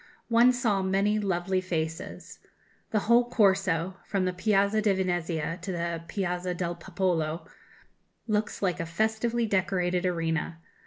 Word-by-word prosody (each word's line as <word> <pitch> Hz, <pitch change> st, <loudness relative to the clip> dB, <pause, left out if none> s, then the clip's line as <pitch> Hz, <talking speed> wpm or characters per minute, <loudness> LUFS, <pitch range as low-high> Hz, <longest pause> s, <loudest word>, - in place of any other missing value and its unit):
One 235 Hz, +2 st, +6 dB
saw 230 Hz, -6 st, +1 dB
many 195 Hz, +3 st, +1 dB
lovely 185 Hz, -1 st, 0 dB
faces.... 165 Hz, -2 st, -4 dB, 0.5 s
The 215 Hz, -, +1 dB
whole 240 Hz, +3 st, +4 dB
Corso, 190 Hz, -5 st, +2 dB
from 195 Hz, -3 st, 0 dB
the 185 Hz, -, 0 dB
Piazza 200 Hz, +2 st, +2 dB
di 210 Hz, -2 st, +3 dB
Venezia 175 Hz, -3 st, -1 dB
to 190 Hz, -, -4 dB
the 170 Hz, -1 st, -2 dB
Piazza 180 Hz, -2 st, -2 dB
del 175 Hz, -1 st, -2 dB
Popolo, 170 Hz, -2 st, -1 dB, 0.8 s
looks 210 Hz, -1 st, -1 dB
like 185 Hz, -2 st, 0 dB
a 165 Hz, -, -3 dB
festively 220 Hz, +6 st, 0 dB
decorated 185 Hz, -3 st, 0 dB
arena. 165 Hz, -2 st, -1 dB
185 Hz, 135 wpm, -28 LUFS, 175-210 Hz, 0.8 s, One